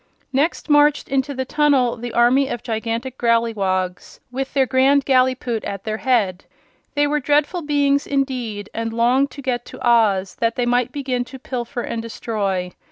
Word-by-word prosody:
Next 290 +6 0
marched 295 -1 +3
into 270 +1 -1
the 260 0 -2
tunnel 275 -4 +2
the 240 0 -6
army 250 +4 +3
of 240 -3 -5
gigantic 230 +3 -3
Growleywogs, 200 -6 0
with 265 +1 -3
their 270 -1 +4
Grand 265 +1 +3
Gallipoot 255 -3 +1
at 195 -1 -5
their 215 0 -3
head. 215 -8 0 0.5
They 290 0 +3
were 300 +1 +1
dreadful 295 +5 +1
beings, 285 -2 +1
indeed, 250 -7 -2
and 225 0 -3
longed 250 +4 +2
to 280 - -10
get 245 -2 -1
to - - -5
Oz 205 -5 +3
that 230 0 +1
they 245 - 0
might 245 0 +1
begin 260 -3 -2
to 260 +2 -10
pilfer 245 -1 -4
and 230 - -4
destroy. 200 -5 -3
250 Hz, 165 wpm, -21 LUFS, 230-275 Hz, 0.5 s, their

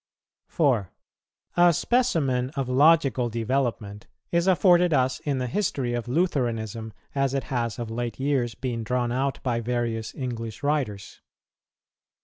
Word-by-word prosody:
4. 130 - +1 0.7
A 175 0 +6
specimen 150 - +1
of 135 -3 -2
logical 135 -3 +4
development 115 -3 -2 0.2
is 170 +1 +1
afforded 180 -2 +4
us 130 -2 +1
in 140 -3 -2
the 130 - -1
history 130 - -1
of 120 0 -3
Lutheranism 120 - -1 0.2
as 135 -1 0
it 135 - -1
has 115 -4 -1
of 115 -2 -5
late 120 0 -4
years 135 -4 0
been 120 -3 -3
drawn 120 +1 -1
out 135 +2 -1
by 120 -3 0
various 115 -1 -2
English 115 -4 -5
writers. 135 -9 -2
125 Hz, 130 wpm, -25 LUFS, 115-145 Hz, 0.7 s, A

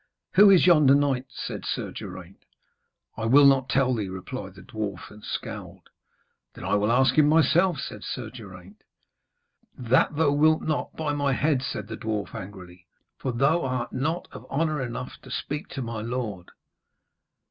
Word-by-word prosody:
'Who 200 +2 +8
is 190 -3 +6
yonder 150 -6 +6
knight?' 135 -3 +1
said - - -6
Sir - - -3
Geraint. 95 -1 -10 0.7
'I 110 - -3
will 140 +4 +7
not 135 -2 +4
tell 135 -2 +2
thee,' 105 -5 -2
replied 95 +1 -7
the 95 - -13
dwarf, 100 -2 -6
and 105 0 -14
scowled. - - -7 0.7
'Then - - -10
I - - -1
will 105 +2 +2
ask 130 +2 +4
him 150 -2 +4
himself,' 165 +3 +3
said - - -7
Sir 120 -4 -5
Geraint. 100 -4 -12 1.0
'That 130 +4 +2
thou 150 -1 +3
wilt 155 +2 +3
not, 155 -1 -2
by 155 -2 -2
my 145 -1 0
head,' 140 0 +1
said 130 - -4
the 110 0 -6
dwarf 110 -2 -3
angrily, 90 -3 -10 0.3
'for 130 - -2
thou 140 +8 +2
art 130 -2 -3
not 160 +7 -2
of - - -12
honour 155 0 0
enough 125 0 -6
to 130 - -14
speak 150 +6 -4
to 135 - -5
my 115 -2 -5
lord.' 110 -6 -4
130 Hz, 170 wpm, -26 LUFS, 105-145 Hz, 1.0 s, Who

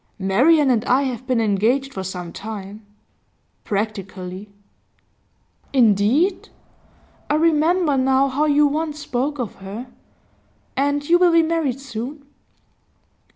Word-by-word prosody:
'Marian 260 - +3
and 230 -3 +1
I 260 +3 +3
have 255 -2 -4
been 255 -2 +1
engaged 230 +6 +1
for 190 - -5
some 180 -2 -6
time 210 0 -8 0.8
practically.' 195 -2 -4 1.2
'Indeed? 245 - +2 0.8
I 295 - +2
remember 320 0 +2
now 265 +1 +3
how 280 +3 0
you 295 0 +4
once 300 +1 -1
spoke 285 +1 -2
of 245 -5 -5
her. 210 +6 -8 0.8
And 285 +1 0
you 345 +1 +4
will 360 -1 +5
be 335 0 +5
married 315 -6 -1
soon? 270 +2 -7
260 Hz, 115 wpm, -21 LUFS, 210-295 Hz, 1.2 s, will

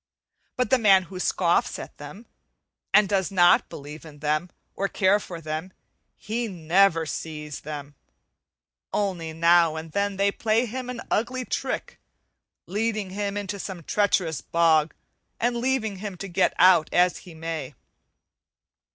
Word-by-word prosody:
but 250 +1 0
the 260 - +5
man 195 -4 +6
who 185 +1 -9
scoffs 175 -1 +1
at - - -9
them, 190 +10 -10 0.7
and 210 -1 +5
does 190 -3 0
not 175 -2 +4
believe 150 +2 -9
in 155 -2 -12
them 155 +4 -1 0.3
or 195 - 0
care 195 +1 +3
for 175 -4 -8
them, 155 +3 -5 0.5
he 230 +3 -3
never 175 -1 +2
sees 150 -1 -6
them. 145 -1 -7 1.0
Only 180 -6 -2
now 170 0 +4
and 160 0 -7
then 200 +2 -1
they 200 +1 +2
play 220 +3 +1
him 250 +2 -5
an 250 -2 -5
ugly 255 +3 0
trick, - - -4 0.7
leading 210 -1 -2
him 200 +1 -3
into 200 0 -4
some 185 -3 -6
treacherous 180 -5 +1
bog 165 -2 +2 0.4
and 240 +1 +1
leaving 235 -5 -1
him 195 -1 -6
to 195 - -6
get 175 - +1
out 180 -3 +6
as 180 0 +3
he 175 -3 -13
may. 160 -4 -5
185 Hz, 145 wpm, -25 LUFS, 160-205 Hz, 1.0 s, man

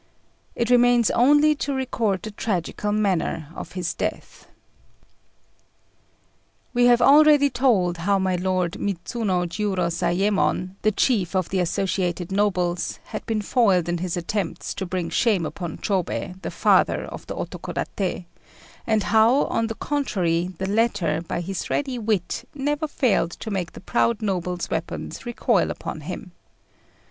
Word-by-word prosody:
It 235 +1 0
remains 245 -2 +5
only 295 +5 +5
to 280 0 -2
record 230 -7 -1
the 215 - -5
tragical 205 0 -2
manner 185 -7 0
of - - -8
his 180 -2 -2
death. - - -5 2.3
We 245 0 +4
have 240 0 +5
already 290 0 +6
told 210 -9 +2
how 195 +4 +1
my 190 -1 0
lord 180 -1 -1
Midzuno 195 -1 -1
Jiurozayémon, 185 0 0
the 215 - +3
chief 200 -5 +1
of 185 -2 0
the 190 - 0
associated 180 0 -1
nobles, 180 -3 0
had - - -6
been 215 -2 -1
foiled 195 -8 +3
in 175 0 -1
his 180 0 -2
attempts 175 +1 -3
to 190 - -4
bring 175 -2 -3
shame 205 -8 +2
upon 170 0 -5
Chôbei, 190 -1 -2
the - - -4
Father - - +3
of - - -9
the - - -5
Otokodaté; 185 -2 -4 0.6
and 220 -2 +2
how, 225 +6 +4
on 230 0 -1
the 225 - -5
contrary, 185 - -1
the 190 - -3
latter, 195 -7 +1
by 170 0 -4
his 185 +1 -4
ready 265 -4 -1
wit, 210 -5 -2
never 295 +2 -1
failed 250 - +1
to 220 - -7
make 185 -4 -3
the - - -10
proud 235 +1 0
noble's 180 -3 -2
weapons - - -4
recoil 240 - +1
upon - - -5
him. - - -7
195 Hz, 140 wpm, -23 LUFS, 180-235 Hz, 2.3 s, already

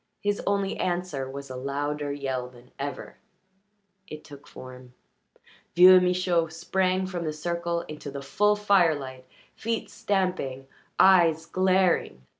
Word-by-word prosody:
His 205 0 -1
only 200 -1 0
answer 175 -7 -3
was 140 0 -8
a - - -6
louder 145 +2 -3
yell 130 -3 -4
than 125 0 -19
ever. 140 -1 -6 0.9
It 155 -3 -9
took 145 -2 -14
form. 125 -1 -12 0.8
Vieux 185 +1 +9
Michaud 180 -2 +1
sprang 185 +3 -1
from 180 -2 -4
the 155 - -2
circle 170 +2 -3
into 150 -2 -9
the 140 0 -7
full 210 +9 +2
firelight, 160 -11 +1 0.3
feet 225 0 -4
stamping, 185 - -2 0.3
eyes 170 -4 +5
glaring. 185 - +1
165 Hz, 125 wpm, -26 LUFS, 140-185 Hz, 0.9 s, Vieux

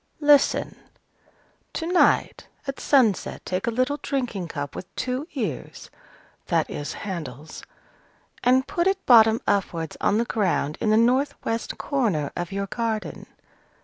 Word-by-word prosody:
Listen. 290 -2 +3 1.0
To 325 - -3
night, 355 +1 +2 0.2
at 275 -1 -5
sunset, 245 -9 +2
take 185 +3 -2
a - - +4
little 255 +5 0
drinking 240 - -2
cup 145 -3 -5
with 180 - -7
two 255 +4 -3
ears" 200 - -5 0.6
(that - - +1
is, 145 - -4
handles), 155 - -7 0.8
"and 255 +2 +4
put 345 +4 0
it 385 0 0
bottom 225 -2 +6
upwards 175 -5 -1
on 205 - +2
the 235 - +1
ground 175 -10 -1
in 215 - +1
the 215 - +4
north 260 +5 +3
west 225 0 -2
corner 205 - -1
of 175 +1 -4
your 200 0 -2
garden. 220 +1 -3
225 Hz, 140 wpm, -24 LUFS, 185-265 Hz, 1.0 s, bottom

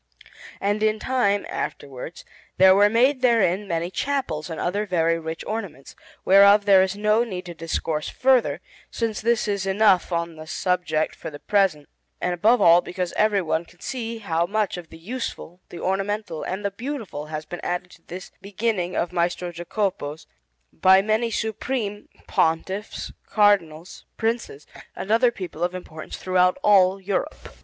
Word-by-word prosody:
And 205 +2 0
in 215 0 +2
time, 215 -5 +1
afterwards, 140 +4 -6 0.3
there 190 0 +7
were 205 +2 +5
made 255 +5 +3
therein 210 -5 +2
many 170 0 -2
chapels 255 - -2
and 160 - -5
other 200 +4 -1
very 165 -2 +1
rich 160 0 -6
ornaments, 200 -11 -6 0.3
whereof 200 +1 +7
there 195 -2 +7
is 190 +1 0
no 210 +2 +3
need 185 -6 -6
to 175 - -7
discourse 160 -1 -3
further, 260 -2 +2 0.3
since 225 -2 -2
this 235 0 +1
is 200 -2 -1
enough 195 -2 +3
on 170 -1 -2
this 155 +2 -9
subject 180 -5 0
for - - -7
the 145 - -9
present, 190 -5 +1 0.3
and 180 - -1
above 215 +6 +3
all 170 +1 +7
because 180 -1 -4
everyone 195 -6 +1
can 175 +1 -22
see 230 -3 -4
how 170 -5 -1
much 215 +1 0
of 175 -2 -9
the 165 - -12
useful, 185 -2 -6
the 175 - -9
ornamental, 195 -2 -2
and 190 +3 -4
the 200 - 0
beautiful 225 - -6
has 155 0 -5
been 175 - -7
added 180 0 -3
to 165 - -17
this 180 +2 -8
beginning 195 -2 -2
of 175 +1 -1
Maestro 175 0 -1
Jacopo's 175 -3 -3 0.5
by 190 +1 +5
many 220 +2 +1
supreme 220 -1 -3 0.2
Pontiffs, 190 +6 -1 0.2
Cardinals, 185 -6 +1
Princes, 225 -10 -2 0.3
and 200 - -5
other 235 +2 +5
people 180 -7 -6
of 180 +1 -1
importance 160 -3 -8
throughout 185 +1 +2
all 195 -2 +5
Europe. 195 0 -4
190 Hz, 160 wpm, -23 LUFS, 170-215 Hz, 0.5 s, there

